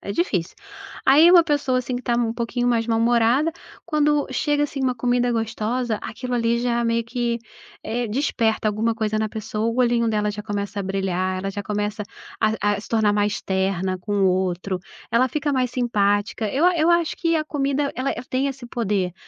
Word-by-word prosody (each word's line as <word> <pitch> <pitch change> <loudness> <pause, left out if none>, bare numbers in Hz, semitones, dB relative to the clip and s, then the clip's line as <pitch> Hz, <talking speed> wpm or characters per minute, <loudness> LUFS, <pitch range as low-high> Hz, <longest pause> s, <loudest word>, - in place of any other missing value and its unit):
é 200 - -5
difícil. 190 - -1 0.5
Aí 300 +5 +7
uma 350 -1 +8
pessoa 290 -5 +1
assim, 255 0 -3
que 250 - -6
tá 240 - 0
um 235 -1 +1
pouquinho 240 +1 -1
mais 230 -2 +1
mal-humorada, 235 +5 +3 0.3
quando 300 -2 +1
chega 290 +3 +1
assim 290 -1 -3
uma 260 -1 +1
comida 245 0 +1
gostosa, 225 +1 -1
aquilo 250 +3 -5
ali 235 0 +1
já 240 -1 0
meio 230 0 +1
que, 235 0 -2 0.4
eh, 240 +2 -2
que - - -8
desperta 225 -5 +1
alguma 220 +2 0
coisa 215 -1 -1
na 215 0 0
pessoa, 215 0 -3
o 230 - 0
olhinho 240 -2 +3
dela 210 -1 0
já 210 0 -6
começa 205 -1 -4
a - - -1
brilhar, 185 -1 -1
ela 195 +1 -3
já 200 0 -6
começa 210 0 -2 0.4
a 210 -2 +1
a - - -6
se - - -12
tornar 220 -2 +2
mais 205 0 0
terna 190 -1 -1
com 195 +3 -5
o - - +5
outro, 185 0 -1 0.3
ela 235 +3 +3
fica 290 +2 -1
mais 255 -2 0
simpática. 215 -3 0
Eu 275 +9 +1
eu 315 +1 +2
acho 340 -2 +2
que 335 -1 +1
a 310 -1 +1
comida 280 -1 -1
ela 260 +2 -1
ela - - -7
tem 260 +2 +1
esse 265 -3 -5
poder, 200 -7 -1
230 Hz, 200 wpm, -23 LUFS, 210-255 Hz, 0.5 s, uma